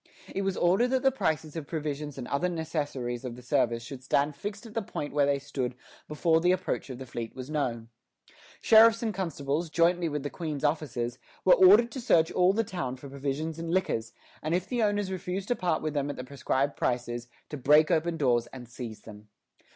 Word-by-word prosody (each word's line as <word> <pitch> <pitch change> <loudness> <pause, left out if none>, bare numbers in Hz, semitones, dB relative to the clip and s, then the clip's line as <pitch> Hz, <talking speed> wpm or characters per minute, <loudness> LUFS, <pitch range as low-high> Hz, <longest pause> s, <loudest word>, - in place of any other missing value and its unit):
It 195 - -1
was 195 -1 -1
ordered 190 +8 +3
that 260 +1 0
the 270 - +5
prices 160 - -1
of 155 -4 -5
provisions 150 -2 -4
and 125 - -6
other 170 +6 0
necessaries 145 -7 -3
of 125 -2 -5
the 125 - -12
service 120 -3 +1
should 130 +1 -9
stand 140 +3 +1
fixed 205 - -6
at 220 - -11
the 225 - -1
point 145 -7 -5
where 145 -1 +3
they 140 0 +2
stood 135 -3 -4 0.3
before 160 +2 +2
the 180 +1 +4
approach 185 -5 -1
of 130 - -6
the 130 - -8
fleet 120 -2 -6
was 130 +3 -7
known. 120 -7 -2 0.7
Sheriffs 225 +1 +7
and 220 -2 -1
constables, 165 -3 -2
jointly 170 +1 +2
with 150 -2 -3
the 145 - -4
Queen's 155 -5 -4
officers, 135 -6 -1 0.3
were 185 - +8
ordered 210 +6 +7
to 260 - -5
search 165 -9 +3
all 180 0 +4
the 225 +3 +1
town 155 - -4
for 135 +2 -11
provisions 140 +4 -3
and 165 0 -4
liquors, 165 -11 0 0.3
and 155 +3 0
if 180 +1 -2
the 245 -2 -1
owners 205 -2 +1
refused 185 +1 -4
to 245 - +2
part 175 -6 -1
with 155 -1 -2
them 145 -1 -1
at 145 - -4
the 125 - -6
prescribed 140 +1 -1
prices, 120 -1 -2 0.2
to - - -5
break 150 +4 +4
open 165 0 +1
doors 120 -5 +2
and 125 -1 -10
seize 120 -2 -8
them. 105 -1 -12
150 Hz, 215 wpm, -28 LUFS, 130-180 Hz, 0.7 s, were